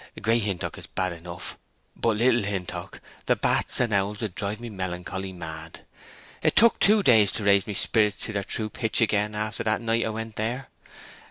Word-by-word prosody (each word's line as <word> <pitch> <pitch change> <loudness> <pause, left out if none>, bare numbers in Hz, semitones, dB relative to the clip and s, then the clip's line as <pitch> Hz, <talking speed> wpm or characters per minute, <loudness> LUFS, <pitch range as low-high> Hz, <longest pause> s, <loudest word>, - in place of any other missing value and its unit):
Great 115 +2 +2
Hintock 100 -4 -3
is - - -9
bad 95 -1 -2
enough—hut 90 +5 -5
Little 120 +1 +4
Hintock—the 100 -3 -3
bats - - +1
and 120 -4 +1
owls 100 +1 0
would 105 -5 -3
drive 100 +3 -3
me 120 - -7
melancholy 95 0 -4
mad! 80 -2 -8 0.6
It - - +2
took 230 +1 +6
two 210 0 +5
days 110 - +6
to 110 - -2
raise 100 -1 +4
my 105 - -3
sperrits 105 0 +2
to 110 - -5
their 100 -1 -1
true 110 +2 -2
pitch 110 -3 -1
again 105 -1 +1
after 110 +1 -2
that 110 -1 +1
night 115 0 +1
I - - -1
went 110 0 -6
there. 120 +5 -3
105 Hz, 180 wpm, -26 LUFS, 95-115 Hz, 0.6 s, took